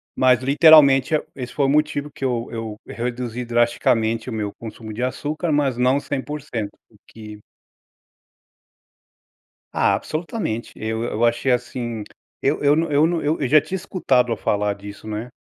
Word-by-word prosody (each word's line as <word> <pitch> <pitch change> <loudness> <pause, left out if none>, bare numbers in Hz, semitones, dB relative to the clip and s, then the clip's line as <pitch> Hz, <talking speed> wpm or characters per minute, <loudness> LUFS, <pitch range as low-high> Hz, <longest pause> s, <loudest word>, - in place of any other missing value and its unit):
mas 125 -2 +4
literalmente 140 0 +6
é - - +2
o - - -13
esse 125 -2 -6
foi 140 - +1
o - - +2
motivo 150 0 0
que - - -9
eu 120 -2 -1
eu 115 -2 -5
reduzi 120 0 -4
drasticamente 115 -1 +1
o - - -5
meu 105 -2 -3
consumo 110 -1 -8
de 115 - -5
açúcar, 150 +6 -2
mas 140 -4 +1
não 130 +3 +3
100%, 140 -6 -4 0.2
o - - -23
que 105 -1 -11 2.3
Ah, - - +3
absolutamente. 155 - -4
Eu 110 +1 -3
eu 115 0 -2
achei 120 +3 +1
assim 120 -2 -2 0.4
eu 140 - 0
eu 145 0 +4
não 165 -1 0
eu 145 +3 +4
não, 170 -1 -1
eu 145 -2 0
já 150 +2 +6
tinha 185 +5 -4
escutado 130 -10 +1
a - - -2
falar 105 0 0
disso, 100 +1 -11
não 110 - -4
é? 120 +3 -6
125 Hz, 165 wpm, -22 LUFS, 115-145 Hz, 2.3 s, literalmente